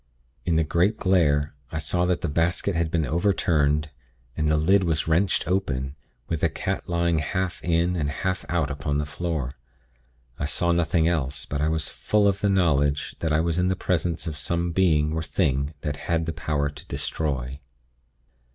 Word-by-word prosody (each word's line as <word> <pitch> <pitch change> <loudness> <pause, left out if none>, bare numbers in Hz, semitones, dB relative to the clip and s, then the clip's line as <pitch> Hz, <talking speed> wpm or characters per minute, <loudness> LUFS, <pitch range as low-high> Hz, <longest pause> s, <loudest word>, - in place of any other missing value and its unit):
In 85 - +3
the 80 - +3
great 90 +7 +2
glare, 75 -6 +2 0.2
I 80 - -3
saw 85 +3 +1
that 90 -1 0
the - - -1
basket 85 +6 +1
had 85 -1 0
been 80 -1 0
overturned, 75 -4 +1 0.4
and 75 -1 0
the 75 - +3
lid 95 +6 +4
was 80 -3 0
wrenched 85 +2 +2
open, 70 -8 -1 0.3
with 80 -2 -2
the - - +3
cat - - -3
lying 85 -1 +2
half 90 +4 -2
in, 85 +1 +2
and 75 -4 -1
half 95 +6 -2
out 80 -5 0
upon 70 0 -2
the 75 - -1
floor. 75 -3 -3 0.9
I - - -1
saw 85 +3 0
nothing 85 -1 +2
else, 75 -4 -1
but 70 0 -3
I 75 - +2
was 80 0 0
full 105 -1 +1
of 100 -1 +1
the 100 - +2
knowledge 75 -7 +2
that 80 - -1
I 75 +1 +3
was 85 +1 0
in 90 - +2
the 95 - +1
presence 85 -2 -1
of 75 -3 -5
some 85 +2 -1
Being 80 -4 +2
or 80 - -1
Thing 75 -3 0
that 75 -3 -3
had 80 -1 0
power 75 -1 0
to 75 +1 -12
destroy. 70 -4 -3
80 Hz, 185 wpm, -25 LUFS, 75-85 Hz, 0.9 s, lid